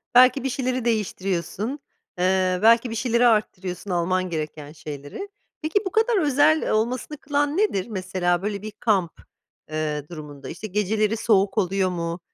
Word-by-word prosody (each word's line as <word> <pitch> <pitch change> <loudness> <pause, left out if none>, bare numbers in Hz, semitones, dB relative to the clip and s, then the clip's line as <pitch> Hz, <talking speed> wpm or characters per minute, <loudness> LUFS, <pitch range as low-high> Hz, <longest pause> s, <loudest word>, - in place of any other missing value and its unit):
belki 255 +2 +7
bir 270 - 0
şeyleri 255 -1 -1
değiştiriyorsun, 200 -2 -1 0.5
ııı, 185 0 +2
belki 230 +2 +5
bir 225 - -4
şeyleri 240 0 +3
arttırıyorsun 195 -3 0
alman 185 +1 0
gereken 155 -2 -5
şeyleri. 150 - -7 0.3
Peki, 315 +6 +1
bu 380 - -2
kadar 445 +1 +3
özel 295 +2 +3
olmasını 245 +7 -1
kılan 290 +3 0
nedir? 315 - +1
Mesela 185 -3 0
böyle 205 0 -3
bir 215 0 -6
kamp, 205 -6 +1 0.6
ııı, 150 -2 -2
durumunda, 145 -5 -9
işte, 215 +6 -6
geceleri 210 +2 0
soğuk 200 -2 +2
oluyor 190 -1 +1
mu, 170 -1 -3
205 Hz, 145 wpm, -24 LUFS, 180-245 Hz, 0.6 s, belki